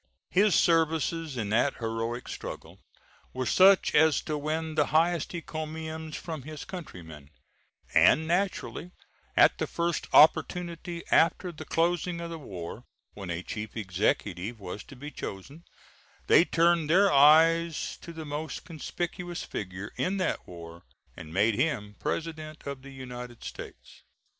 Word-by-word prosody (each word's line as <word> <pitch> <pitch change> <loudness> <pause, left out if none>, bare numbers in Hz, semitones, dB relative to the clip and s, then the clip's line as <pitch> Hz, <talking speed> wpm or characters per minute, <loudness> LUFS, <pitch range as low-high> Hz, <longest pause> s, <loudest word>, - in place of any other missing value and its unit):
His 200 0 +4
services 165 -2 +1
in 105 -4 -2
that 120 +6 +2
heroic 115 +1 -3
struggle - - -8 0.5
were 130 0 -2
such 190 - +5
as 160 -1 +5
to 155 - -3
win 155 +2 -2
the 150 -2 +2
highest 165 +2 +1
encomiums 160 -1 -5
from 160 -4 -6
his 150 +2 -8
countrymen, 80 - -9 0.6
and 160 +1 +5
naturally 180 0 -1 0.5
at - - +5
the - - -1
first 170 -1 -2
opportunity 170 +2 +3
after 175 +2 +3
the 155 -1 -9
closing 170 +2 0
of 170 0 -6
the 165 - -6
war 95 - -8 0.3
when 95 -3 -8
a 85 +1 -3
Chief 110 +3 -6
Executive 100 +1 -1
was 100 +1 -7
to 140 - -12
be 145 +4 -8
chosen 140 - -8 0.6
they 170 - +6
turned 170 -2 +2
their 195 +3 +5
eyes 160 +3 +4
to 170 - -9
the 160 -1 -8
most 150 +2 -5
conspicuous 175 +1 -5
figure 95 +1 -6
in 190 +2 0
that 185 - -2
war 85 -1 -10 0.3
and 80 - -10
made 105 +6 +3
him 110 -5 -1
President 155 -1 -4
of 140 -2 -5
the 140 - -11
United 125 -2 -9
States. - - -10
155 Hz, 140 wpm, -28 LUFS, 115-165 Hz, 0.6 s, they